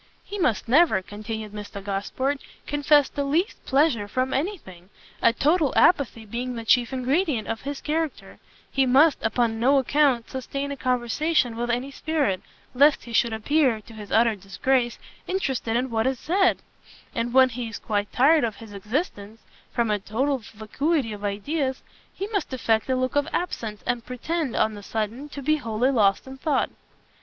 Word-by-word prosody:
"He 410 - -7
must 250 - +1
never," 265 - +4
continued 215 +1 -6
Mr 205 -1 -7
Gosport, 235 +8 -2 0.2
"confess 290 0 +3
the 285 - -3
least 315 +8 -1
pleasure 270 -7 +2
from 255 +4 -1
any 365 +10 -1
thing, 180 - -15 0.3
a 230 - +5
total 300 +4 +2
apathy 265 -9 +3
being 245 +4 -4
the 230 -1 -6
chief 240 +1 +3
ingredient 265 - 0
of 225 0 -3
his 280 0 -5
character: 315 -1 -3 0.3
he 270 -1 +2
must, 280 +4 +5
upon 225 0 0
no 270 +4 +4
account, 270 -3 +2
sustain 275 +2 -4
a - - -3
conversation 255 +1 0
with 240 +1 -3
any 245 +4 -1
spirit, 285 - -1 0.3
lest 285 +3 +4
he 235 - -9
should 235 0 +3
appear, 245 +2 +2
to 225 - -15
his 210 -2 -10
utter 230 0 +4
disgrace, 235 +6 0 0.3
interested 265 -11 -1
in 255 0 -2
what 225 +1 +1
is 265 -1 0
said: 370 +3 +2 0.5
and 235 0 -2
when 260 +1 +6
he 240 -1 -5
is 225 - -6
quite 205 -1 -2
tired 295 +4 +4
of 225 -3 -1
his 220 -1 -12
existence, 215 - -4 0.3
from 235 -3 0
a 210 - +1
total 260 +8 -1
vacuity 225 +5 -2
of 205 0 -9
ideas, 260 +7 -2 0.3
he 390 - -5
must 405 -8 -2
affect 230 -2 0
a 260 - +2
look 255 +1 -1
of 290 +1 +2
absence, 225 -12 -3
and 240 -1 -1
pretend, 270 +3 -3
on 215 - +2
the 205 - -9
sudden, 225 +7 -4
to 280 -1 -8
be 310 +3 +2
wholly 235 0 0
lost 200 -6 +2
in 265 0 -10
thought." 290 -2 0
250 Hz, 175 wpm, -25 LUFS, 220-285 Hz, 0.5 s, when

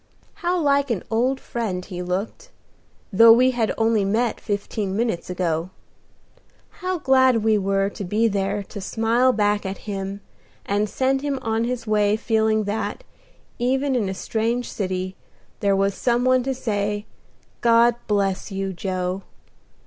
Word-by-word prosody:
How 355 0 +1
like 280 -2 +2
an 220 -7 -1
old 255 +4 +1
friend 195 -6 -4
he 180 -2 -6
looked, 195 - -4 0.6
though 230 +3 +8
we 250 +3 +6
had 235 -3 0
only 225 -2 +2
met 220 +4 0
fifteen 200 -1 -3
minutes 220 -6 -1
ago; 175 -2 -1 1.1
how 370 0 -1
glad 260 -6 +3
we 220 -1 +3
were 195 0 +1
to 205 - -6
be 210 +5 +1
there 200 0 -1
to 200 - -9
smile 230 +6 +2
back 205 -2 +1
at 195 0 -6
him, 195 0 -4 0.4
and 205 +1 0
send 265 +5 0
him 285 -1 -1
on 225 +1 0
his 245 -1 -3
way 210 -1 +2
feeling 220 -1 +1
that, 210 - -3 0.6
even 265 +3 +1
in 215 -6 0
a 190 - -4
strange 230 +4 -2
city, 185 -1 -3 0.4
there 200 -1 +2
was 195 +1 +1
some 240 +3 0
one 255 0 +4
to 270 -1 -1
say, 205 -3 -2 0.6
"God 235 0 +5
bless 200 -1 0
you, 195 0 -3
Joe!" 185 0 -3
215 Hz, 150 wpm, -23 LUFS, 195-240 Hz, 1.1 s, though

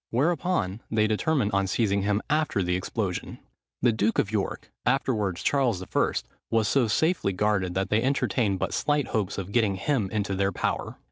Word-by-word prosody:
Whereupon, 145 - 0
they 110 -1 +2
determined 110 +1 +1
on 100 0 +1
seizing 100 0 +1
him 105 +1 0
after 150 -10 +1
the 90 0 0
explosion. 95 0 -3 0.5
The 120 - +5
duke 110 0 0
of 100 - +1
York, 105 -3 -3
afterwards 95 -4 0
Charles 125 -10 +1
I., - - 0 0.4
was 110 -2 +2
so 125 +1 +3
safely 160 - +1
guarded, 95 -2 0
that 95 +1 -1
they 110 - +3
entertained 120 -5 +1
but - - -2
slight 145 -4 0
hopes 100 -3 -1
of 100 0 -5
getting 105 -3 +2
him 105 0 0
into 100 -2 -1
their 95 +1 +1
power. - - -2
105 Hz, 175 wpm, -26 LUFS, 95-120 Hz, 0.5 s, The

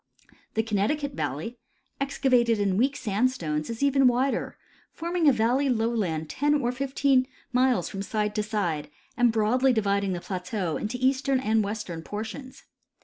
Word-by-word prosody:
The 220 - +2
Connecticut 225 +8 0
valley, 155 - -4 0.4
excavated 255 -4 +2
in 200 -2 +1
weak 265 +7 +2
sand 230 +1 +1
stones, 155 -9 -3
is 230 +3 -3
even 275 -1 +4
wider, 250 +3 0 0.3
forming 340 -2 +1
a - - +6
valley 250 +4 +2
loAvland 220 -9 0
ten 290 - +1
or 245 -4 +1
fifteen 265 0 +1 0.3
miles 250 -7 +2
from 195 - -5
side 210 +1 -1
to 210 - 0
side 175 -9 -2 0.3
and 245 -1 +4
broadly 235 +5 +3
dividing 200 -3 +1
the 175 - -3
plateau 185 -1 -3
into 215 +4 -3
eastern 265 +1 +2
and 220 -3 +2
western 200 -5 -4
portions. 225 +8 -7
230 Hz, 150 wpm, -26 LUFS, 200-260 Hz, 0.4 s, a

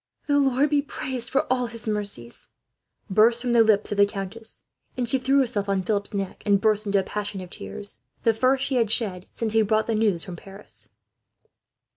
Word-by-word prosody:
"The 285 -1 +3
Lord 275 +1 +2
be 290 -1 +3
praised 255 -4 -5
for 270 - +1
all 250 -1 -1
His 230 -1 -7
mercies!" 200 - -3 0.6
burst 220 +4 +4
from 240 0 0
the 235 - +6
lips 215 -2 +3
of 205 - -2
the 200 - +6
countess, 205 +2 -7 0.3
and 245 -1 -1
she 265 +3 +1
threw 265 +2 +2
herself 210 -6 -2
on 195 -1 +1
Philip's 200 -1 -1
neck, 195 -2 -4
and 200 -1 +3
burst 215 0 +1
into 200 0 +2
a - - 0
passion 205 0 -4
of 180 -1 -9
tears, 100 - -6 0.2
the 230 - +4
first 260 +4 +2
she 270 - 0
had 230 -3 +2
shed 200 -5 -1
since 220 -2 -2
he 225 - +4
brought 215 +1 +2
the 230 - -1
news 210 -6 +1
from 180 -2 -8
Paris. 195 +4 -11
215 Hz, 205 wpm, -25 LUFS, 200-240 Hz, 0.6 s, the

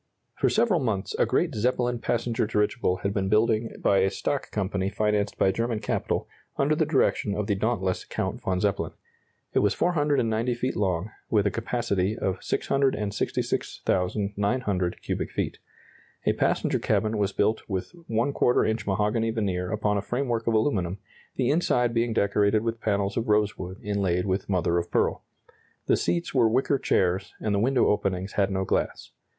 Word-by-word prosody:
For - - +2
several 220 -6 +2
months 110 -8 -2
a - - +4
great - - +1
Zeppelin 120 +1 0
passenger 115 -1 0
dirigible 105 -3 0
had 100 0 0
been 95 -2 -1
building 110 +1 +2
by 100 - +3
a 95 +1 +3
stock 140 +8 -2
company 95 -1 -1
financed 105 0 0
by 95 - +3
German 115 +2 -1
capital, - - -2 0.3
under 140 +2 +2
the 155 0 +1
direction 130 -8 +1
of 105 - -1
the 100 - +1
dauntless 95 -2 -1
Count - - -3
von 95 -1 -1
Zeppelin. 100 0 -1 0.6
It - - +3
was 105 - +2
490 135 -8 +1
feet 130 +2 -2
long, 95 0 -1 0.2
with 105 -2 +2
a 100 - +2
capacity 110 -4 -1
of 95 - -2
666,900 100 -4 -1
cubic - - -2
feet. - - -3 0.7
A - - +3
passenger - - +1
cabin 110 0 0
was 100 -1 +1
built 105 +3 +1
with 95 -2 -3 0.2
¼ 120 +2 +2
inch 110 -2 -2
mahogany 105 +3 +1
veneer 95 -5 -1
upon 105 -1 0
a - - -2
framework 120 0 -2
of 115 - +2
aluminum, 100 -6 +1 0.4
the 130 0 +1
inside 125 -7 +2
being 115 0 +1
decorated 105 +1 +2
with 115 0 -3
panels 100 -2 0
of 115 -1 -1
rosewood 100 -3 0
inlaid 95 -4 0
with 95 +1 -1
mother 85 -2 +2
of 85 - -5
pearl. - - +1 0.6
The - - +4
seats 170 -1 -1
were 120 -4 +4
wicker 130 +4 +2
chairs, 95 -2 0
and 105 - -1
the 100 - +2
window 125 +3 +3
openings 95 -2 0
had 100 -1 +1
no 95 -1 -1
glass. - - -2
105 Hz, 165 wpm, -26 LUFS, 95-120 Hz, 0.7 s, a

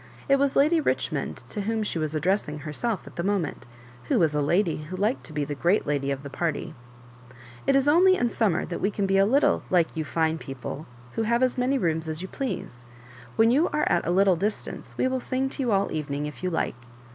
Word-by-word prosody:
It 275 - +5
was 280 0 +1
Lady 315 +4 +4
Richmond - - -1
to 210 - -3
whom 220 +2 -1
she 175 - -2
was 155 0 -2
addressing 155 -1 0
herself 175 +7 -3
at - - -13
the 170 - -1
moment, 195 -10 -1 0.4
who - - +1
was 160 -3 +3
a 150 - +1
lady 170 +4 +2
who 180 +4 -6
liked 215 +7 0
to - - -10
be 150 -1 -1
the 145 - -4
great 175 +8 +1
lady 140 -1 -1
of 140 0 -3
the 140 - -6
party. 165 0 -2 0.5
*' 120 -1 -19
It 275 - +4
is 275 +1 +3
only 365 +5 +6
in 240 -8 0
summer 200 -8 +1
that 175 - -5
we 200 - +2
can 200 -1 -1
be 195 0 +3
a 195 - +5
little 275 +6 +3
like 175 -3 +2
you 160 - -1
fine 160 +2 0
people, 135 +2 -7 0.2
who - - -2
have. 235 +3 +2
as 255 - +2
many 255 +2 +1
rooms 160 -6 -1
as 155 0 -3
you 185 - -5
please. 190 - -5 0.5
When 225 +1 +5
you 295 +7 +3
are 300 - 0
at 175 - +1
a - - +1
little 190 +1 +4
distance 205 +5 -4
we - - +2
will 260 0 -1
sing 260 +1 -1
to 280 - -4
you 245 -3 +1
all 195 -1 +3
the - - -5
evening, 145 -1 -3
if 150 - -7
you 185 - 0
like." 165 - -1
185 Hz, 240 wpm, -26 LUFS, 155-240 Hz, 0.5 s, only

